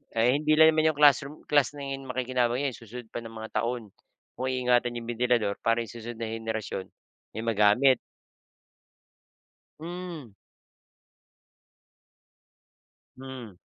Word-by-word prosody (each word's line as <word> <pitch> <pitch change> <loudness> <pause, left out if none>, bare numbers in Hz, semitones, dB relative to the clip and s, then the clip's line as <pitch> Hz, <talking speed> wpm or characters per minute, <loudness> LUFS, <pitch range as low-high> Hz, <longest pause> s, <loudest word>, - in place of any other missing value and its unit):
Eh, 120 +5 +4
hindi 155 0 +2
lang 160 0 +8
naman 155 0 +3
yung 145 - -13
classroom 140 0 +5
class 145 -2 +3
na 145 - -8
’yon 135 -1 -5
ang 125 - -4
makikinabang 125 0 0
'yan, 140 - +1
susunod 115 +1 -10
pa - - -5
ng 115 -1 -10
mga 110 0 -7
taon. 120 -3 -3 0.5
Kung 130 - -2
iingatan 125 -1 +2
yung 120 0 -6
bentilador 120 -4 +1
para 115 +1 +1
yung 115 - -11
susunod 115 0 -8
na 110 - -2
henerasyon 110 -4 -4 0.5
may 110 - -3
magamit. 115 +4 +4 1.8
Hmm. 170 - -7 2.9
Mm. 130 -7 -9
125 Hz, 130 wpm, -27 LUFS, 115-135 Hz, 2.9 s, lang